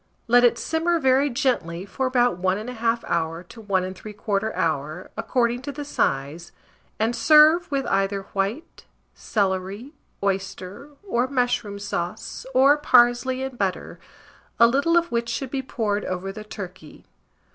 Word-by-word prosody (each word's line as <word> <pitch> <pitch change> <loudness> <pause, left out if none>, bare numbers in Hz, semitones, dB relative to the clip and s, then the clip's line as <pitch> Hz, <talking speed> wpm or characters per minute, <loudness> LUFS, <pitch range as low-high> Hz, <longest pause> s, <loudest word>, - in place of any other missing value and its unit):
Let 245 +1 +5
it 240 - +4
simmer 335 +2 0
very 265 0 +3
gently 195 -9 -1
for 260 +6 -2
about 245 -7 +2
1 185 +1 +1
1/2 230 +1 -2
hour 165 0 -1
to 225 +5 -13
1 190 -3 -1
3/4 210 +1 -3
hour, 155 +2 -2
according 235 +2 0
to 285 +2 -5
the 290 +1 -7
size, 145 - -2 0.5
and 225 +2 0
serve 305 +8 +6
with 275 -2 -1
either 195 0 0
white, 200 +10 -3 0.3
celery, 200 +5 -2 0.3
oyster, 195 +5 -3 0.2
or 245 -7 +1
mushroom 245 -6 -1
sauce, 190 +2 -5
or 275 +3 +6
parsley 255 -1 +3
and 265 -2 -6
butter, 190 -2 -3 0.6
a 235 - +8
little 280 +8 +3
of 340 0 +1
which 235 0 -1
should 255 +2 -3
be 275 - -1
poured 215 -6 -2
over 185 +1 -4
the 210 +2 -8
turkey. 185 -6 -10
230 Hz, 145 wpm, -24 LUFS, 190-260 Hz, 0.6 s, a